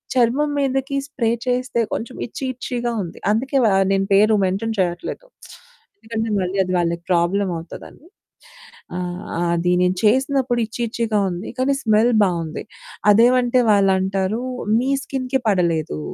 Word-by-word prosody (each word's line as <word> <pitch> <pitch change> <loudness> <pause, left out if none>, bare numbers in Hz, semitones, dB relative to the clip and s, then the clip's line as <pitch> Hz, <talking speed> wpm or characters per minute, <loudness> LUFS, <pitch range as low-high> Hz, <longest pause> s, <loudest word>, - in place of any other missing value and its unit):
చర్మం 255 +5 +2
మీదకి 270 0 -1
స్ప్రే 250 -6 -1 0.2
చేస్తే 250 -1 0
కొంచెం 235 +3 -4
ఇట్చీ 245 - -8
ఇట్చీగా 240 -1 -3
ఉంది. 170 - -9
అందుకే 265 +6 0
వా 215 - +4 0.2
నేను 195 0 +1
పేరు 215 +2 +5
మెన్షన్ 200 +4 -2
చేయట్లేదు. 175 - -2 0.7
ఎందుకంటే 225 - -4
మళ్ళీ 185 +2 -2
అది 185 - -3
వాళ్ళకి 170 0 -1
ప్రాబ్లమ్ 180 +3 +1
అవుతదని. 165 - -11 0.9
ఆ! - - -2 0.6
అది 175 +1 0
నేను 180 0 +2
చేసినప్పుడు 260 +2 +2
ఇట్చీ 225 +2 -7
ఇట్చీగా 225 -2 -1
ఉంది. 175 +3 -5
కానీ 265 +2 +2
స్మెల్ 220 +2 +3
బావుంది. 170 -4 -2 0.5
అదేమంటే 245 +3 +4
వాళ్ళు 200 -2 +4
అంటారు, 190 +4 -1 0.4
"మీ 255 +3 0
స్కిన్‌కి 265 0 -2
పడలేదు. 165 - 0
220 Hz, 135 wpm, -21 LUFS, 185-250 Hz, 0.9 s, పేరు